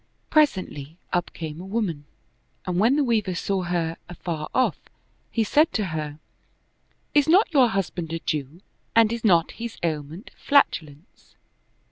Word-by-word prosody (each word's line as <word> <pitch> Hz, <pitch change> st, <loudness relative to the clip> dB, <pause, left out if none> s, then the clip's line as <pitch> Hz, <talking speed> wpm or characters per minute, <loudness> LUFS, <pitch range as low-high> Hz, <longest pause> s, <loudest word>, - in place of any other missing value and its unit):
Presently, 185 Hz, -, +1 dB, 0.2 s
up 175 Hz, -2 st, 0 dB
came 160 Hz, 0 st, -7 dB
a -, -, -8 dB
woman, 195 Hz, -9 st, -2 dB, 0.6 s
and 180 Hz, -1 st, -1 dB
when 230 Hz, +7 st, +4 dB
the 295 Hz, -, +3 dB
Weaver 215 Hz, -7 st, 0 dB
saw 195 Hz, +2 st, -1 dB
her 170 Hz, -2 st, -2 dB
afar 170 Hz, -3 st, -5 dB
off, 255 Hz, -, +1 dB, 0.5 s
he 225 Hz, -, +1 dB
said 300 Hz, +8 st, +3 dB
to 215 Hz, -, 0 dB
her, 150 Hz, -2 st, -4 dB, 0.5 s
" -, -, -43 dB
Is 290 Hz, -1 st, +4 dB
not 360 Hz, +1 st, +4 dB
your 265 Hz, -4 st, +6 dB
husband 180 Hz, -6 st, -3 dB
a 165 Hz, -, -1 dB
Jew 155 Hz, +1 st, -4 dB, 0.3 s
and 230 Hz, 0 st, +5 dB
is 235 Hz, -, -5 dB
not 170 Hz, -6 st, +4 dB
his 230 Hz, 0 st, -7 dB
ailment 160 Hz, -, -4 dB
flatulence?" 165 Hz, -, 0 dB
180 Hz, 150 wpm, -24 LUFS, 160-230 Hz, 0.6 s, your